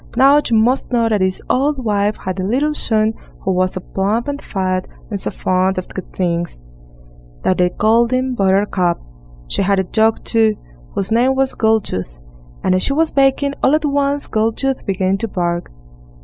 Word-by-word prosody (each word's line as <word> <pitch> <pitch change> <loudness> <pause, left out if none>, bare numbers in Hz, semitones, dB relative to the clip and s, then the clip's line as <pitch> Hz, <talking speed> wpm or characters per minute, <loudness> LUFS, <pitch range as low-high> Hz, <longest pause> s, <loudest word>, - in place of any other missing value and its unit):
Now, 275 +3 +6
you 230 - +3
must 245 +5 +1
know 235 -2 +2
that 215 -2 +1
this 185 0 -1
old 270 -1 0
wife 205 0 +1
had 185 0 -3
a - - -1
little 270 +10 +1
son, 220 -5 +1 0.3
who 190 - -1
was 185 0 +1
so 185 - -5
plump 205 +7 -1
and 285 0 -3
fat, 185 -2 -2 0.2
and 200 - -1
so - - +1
fond 185 +1 0
of 185 - -4
good 190 - -8
things, 170 - -2 0.8
that 185 - +1
they 180 0 +4
called 225 +5 +2
him 255 +1 0
Buttercup; 190 -4 +1 0.5
she - - -1
had 195 +1 +2
a 190 - +2
dog, 220 +4 +1
too, 220 -2 +2 0.4
whose 195 - -2
name 250 +4 +3
was 270 0 +1
Goldtooth, 210 - 0 0.5
and - - +2
as 185 - +2
she 275 - +1
was 320 +2 +1
baking, 275 +1 +2
all 275 - +4
at 310 0 0
once 285 0 0
Goldtooth 225 +5 -1
began 190 0 0
to 230 - -2
bark. 175 -3 -2
215 Hz, 185 wpm, -18 LUFS, 185-255 Hz, 0.8 s, Now